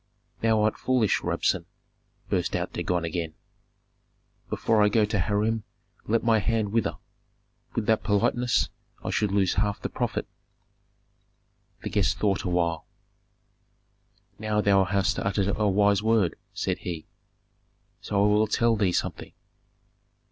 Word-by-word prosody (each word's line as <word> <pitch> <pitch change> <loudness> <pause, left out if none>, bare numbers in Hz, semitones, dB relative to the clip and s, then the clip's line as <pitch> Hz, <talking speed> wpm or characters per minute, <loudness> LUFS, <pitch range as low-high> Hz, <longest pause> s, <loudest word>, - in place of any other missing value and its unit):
"Thou 110 -1 +3
art 110 - +1
foolish, 125 -6 +2
Rabsun!" - - 0 0.6
burst - - -1
out - - -3
Dagon 90 -2 -1
again. 80 -1 -3 1.1
"Before 110 -2 +2
I 105 - +5
go 110 0 +3
to 105 -1 -1
Hiram 105 +4 0 0.4
let 115 +1 +1
my 115 -1 +4
hand 110 -1 0
wither; 115 0 0 0.8
with 115 - -1
that 110 0 +2
politeness 120 +4 +1 0.3
I - - -2
should 105 -2 0
lose 95 -3 +2
half 105 0 0
the - - -4
profit." - - -2 1.6
The - - -4
guest 95 -3 +1
thought 100 +2 +1
awhile. 85 -3 0 1.5
"Now 105 0 0
thou 100 -2 +4
hast 100 0 0
uttered 100 0 0
a 105 -1 +1
wise 100 +1 +3
word," 110 -6 +2 0.2
said - - -2
he; 85 -3 -5 1.0
"so 100 -1 +1
I - - +5
will 105 +1 +3
tell 115 +2 +2
thee 100 -4 +1
something. - - -3
105 Hz, 135 wpm, -26 LUFS, 95-110 Hz, 1.6 s, I